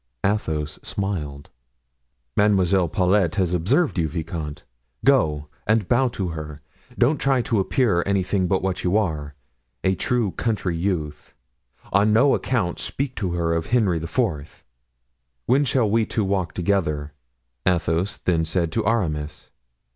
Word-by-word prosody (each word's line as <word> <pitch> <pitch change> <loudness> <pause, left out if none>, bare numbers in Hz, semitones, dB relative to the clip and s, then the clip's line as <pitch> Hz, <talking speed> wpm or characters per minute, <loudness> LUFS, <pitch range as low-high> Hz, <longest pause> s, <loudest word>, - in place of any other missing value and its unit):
Athos 80 -8 -1
smiled. 75 -8 -4 0.8
"Mademoiselle 95 -4 +3
Paulet 95 -2 +2
has 90 -4 +1
observed 105 - +1
you, 80 - +1
vicomte; 80 -2 -5 0.4
go 75 -1 +3 0.2
and 110 -3 +2
bow 130 +2 +3
to 95 -6 -3
her; 75 -2 -6 0.4
don't 135 +5 +3
try 135 -2 +3
to 115 -3 0
appear 95 -1 +2
anything 95 -1 +1
but 95 0 0
what 95 -1 -2
you 90 +3 +2
are, 75 -8 -2 0.5
a 95 - +3
true 115 0 0
country 100 -6 -1
youth; 80 -4 -3 0.6
on 100 +2 +4
no 130 +6 +5
account 105 -10 -1
speak 140 -1 -2
to 90 -4 -2
her 85 -1 0
of 85 -1 -1
Henry 110 -8 +2
IV." 80 - -2 0.8
"When 135 +4 +3
shall 125 -3 +2
we 110 +1 +2
two 110 - -1
walk 95 -4 -1
together?" 80 -6 -1 0.5
Athos 85 +2 +1
then 85 -3 +1
said 80 0 -1
to 85 - -1
Aramis. 80 -10 -2
95 Hz, 140 wpm, -23 LUFS, 80-105 Hz, 0.8 s, no